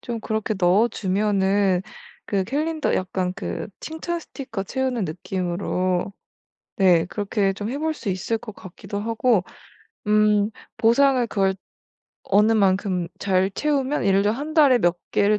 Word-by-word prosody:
좀 235 -2 -5
그렇게 220 0 -2
넣어 190 +5 +4
주면은 195 -2 +1 0.4
그 195 -2 -1
캘린더 310 +6 -1
약간 185 0 -1
그 195 - -5
칭찬 335 +2 -4
스티커 240 -11 -6
채우는 255 -1 -2
느낌으로 180 +2 -2 0.7
네 180 -4 +4
그렇게 200 0 -1
좀 205 +2 -5
해 265 - -3
볼 315 +1 -1
수 225 -8 -5
있을 190 +5 -2
것 215 -2 -10
같기도 195 +2 -7
하고 225 -2 +1 0.6
음 210 0 +3 0.3
보상을 250 +2 +3
그걸 195 -3 +1 0.7
어느 210 +3 +3
만큼 190 -4 +1
잘 190 -1 +1
채우면 280 +1 0
예를 195 0 +4
들어 205 - +2
'1 295 +6 -5
달에 280 -6 +6
몇 175 -1 +2
개를 205 +1 +3
205 Hz, 260 characters per minute, -23 LUFS, 190-240 Hz, 0.7 s, 달에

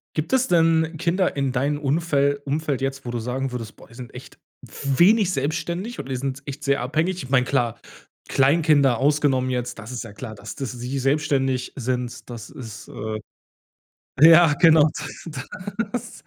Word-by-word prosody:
Gibt 155 +9 -2
es 260 -1 +3
denn 165 -1 +3
Kinder 175 0 0
in 135 -2 0
deinen 140 +4 0
Unfel 145 -1 +1
Umfeld 145 -1 -2
jetzt, 135 0 -3
wo 120 - -4
du 120 - -2
sagen 125 +3 -3
würdest: 115 -3 -6
„Boah, - - -15
die - - -18
sind 125 -1 -10
echt - - -12 0.2
wenig 180 - +2
selbstständig 170 - -3
oder 135 -1 -6
die 130 - -2
sind 135 +1 -4
echt 145 +1 -7
sehr 140 -2 +2
abhängig?“ 160 +7 -1
Ich 130 - -9
meine, 125 -2 +3
klar, 120 -5 0 0.5
Kleinkinder 140 -2 +3
ausgenommen 135 -1 +2
jetzt, 125 -2 -3
das 110 +2 -9
ist 125 -2 -4
ja 110 - -10
klar, 110 0 -8
dass 105 +1 -9
dass 135 -4 -4
sie 125 +3 -4
selbstständig 135 -2 0
sind, 125 -1 -3
das 115 -3 -8
ist, 110 -3 -10
äh 110 0 -5 1.0
ja, 165 0 +8
genau. 160 -2 +7 1.0
Das 245 - -6
140 Hz, 170 wpm, -23 LUFS, 125-155 Hz, 1.0 s, ja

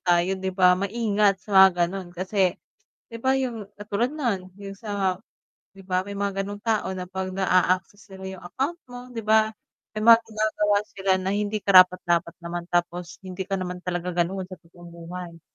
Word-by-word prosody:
tayo 175 +2 +3
'di 190 0 -2
ba 180 -1 +6
maingat 205 -1 +1
sa - - -14
mga 190 0 +9 0.2
gano’n. 185 0 -6
Kasi 185 0 +1 0.6
'di 230 - -6
ba, 265 0 +3
yung 235 -6 -3
katulad 210 +4 -1
no’n, 230 -12 -2
yung 200 -1 -8
sa 200 -4 -1 0.6
‘di 195 - -12
ba, 185 -1 0
may 200 0 -6
mga 200 -1 -1
gano’ng 205 +1 -6
tao 220 -4 +1
na 180 - -4
‘pag 190 0 -4
naa-access 185 +1 +1
nila 190 0 -9
yung - - -14
account 275 - -3
mo, 245 0 -8
‘di 230 - -4
ba 220 0 +4 0.4
may 215 0 -4
mga 230 0 +10
ginagawa 215 -2 0
sila 195 -1 -2
na 185 +1 -2
hindi 210 +1 -1
karapat-dapat 180 -3 +5
naman 170 0 -5
tapos 175 0 -2
hindi 185 0 -5
ka 195 0 -3
naman 180 0 -5
talaga 175 0 -3
gano’n 190 +1 -5
sa 185 - -9
totoong 175 +1 -16
buhay. 170 0 -9
190 Hz, 180 wpm, -25 LUFS, 180-210 Hz, 0.6 s, mga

